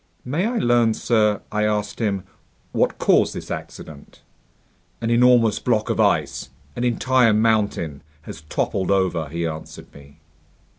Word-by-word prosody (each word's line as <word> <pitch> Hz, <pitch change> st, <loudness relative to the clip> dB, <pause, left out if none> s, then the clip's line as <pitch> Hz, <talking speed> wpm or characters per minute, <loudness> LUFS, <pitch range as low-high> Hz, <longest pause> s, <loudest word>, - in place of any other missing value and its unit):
"May 155 Hz, -, -1 dB
I 240 Hz, +1 st, -2 dB
learn, 120 Hz, -, +2 dB
sir," 105 Hz, -3 st, +1 dB
I 105 Hz, 0 st, 0 dB
asked 105 Hz, -1 st, -1 dB
him, 100 Hz, -5 st, -1 dB, 0.5 s
"what -, -, 0 dB
caused -, -, +2 dB
this -, -, -7 dB
accident?" 75 Hz, -2 st, -9 dB, 0.8 s
"An 115 Hz, 0 st, -2 dB
enormous 120 Hz, -2 st, +4 dB
block 110 Hz, -3 st, 0 dB
of -, -, -3 dB
ice, -, -, +1 dB, 0.3 s
an 120 Hz, -, -3 dB
entire 125 Hz, -1 st, +3 dB
mountain, 105 Hz, -9 st, 0 dB, 0.2 s
has -, -, -9 dB
toppled 95 Hz, -2 st, -1 dB
over," 90 Hz, -6 st, 0 dB
he 85 Hz, +2 st, -3 dB
answered 80 Hz, -1 st, -8 dB
me. 70 Hz, +1 st, -16 dB
105 Hz, 140 wpm, -22 LUFS, 95-120 Hz, 0.8 s, enormous